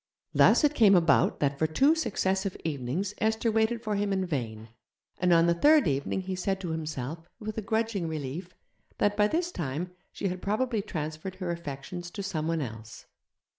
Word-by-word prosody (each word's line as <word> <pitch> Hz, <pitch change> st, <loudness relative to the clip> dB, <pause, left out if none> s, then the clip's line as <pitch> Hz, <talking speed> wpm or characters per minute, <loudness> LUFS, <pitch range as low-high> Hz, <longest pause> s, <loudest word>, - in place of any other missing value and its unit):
Thus -, -, +5 dB
it 295 Hz, 0 st, +4 dB
came 215 Hz, -8 st, +6 dB
about 170 Hz, -2 st, +3 dB
that 140 Hz, -1 st, +1 dB
for 160 Hz, -, +3 dB
two 270 Hz, -, +4 dB
successive 195 Hz, -, -1 dB
evenings 160 Hz, +6 st, -2 dB
Esther 220 Hz, +1 st, +1 dB
waited 225 Hz, +1 st, +1 dB
for 215 Hz, -, -1 dB
him 205 Hz, 0 st, 0 dB
in 190 Hz, -1 st, 0 dB
vain, 115 Hz, -9 st, -4 dB, 0.5 s
and 180 Hz, 0 st, +2 dB
on 165 Hz, -1 st, +6 dB
the 170 Hz, -, +4 dB
third 295 Hz, -, +5 dB
evening 140 Hz, +6 st, 0 dB
he 190 Hz, 0 st, -4 dB
said 190 Hz, +1 st, -1 dB
to 180 Hz, -, -4 dB
himself, 160 Hz, 0 st, -4 dB
with 215 Hz, -1 st, -5 dB
a -, -, -3 dB
grudging 220 Hz, -3 st, -1 dB
relief, 160 Hz, +4 st, -5 dB, 0.4 s
that 205 Hz, 0 st, +2 dB
by 210 Hz, 0 st, +4 dB
this 340 Hz, +8 st, -1 dB
time 165 Hz, -, -3 dB, 0.2 s
she 200 Hz, -, -3 dB
had 180 Hz, 0 st, -4 dB
probably 220 Hz, +2 st, 0 dB
transferred 155 Hz, +1 st, -5 dB
her 185 Hz, -2 st, -3 dB
affections 170 Hz, +2 st, -6 dB
to 200 Hz, +2 st, -6 dB
someone 165 Hz, -3 st, -1 dB
else. 110 Hz, -4 st, -8 dB
180 Hz, 180 wpm, -28 LUFS, 155-210 Hz, 0.5 s, came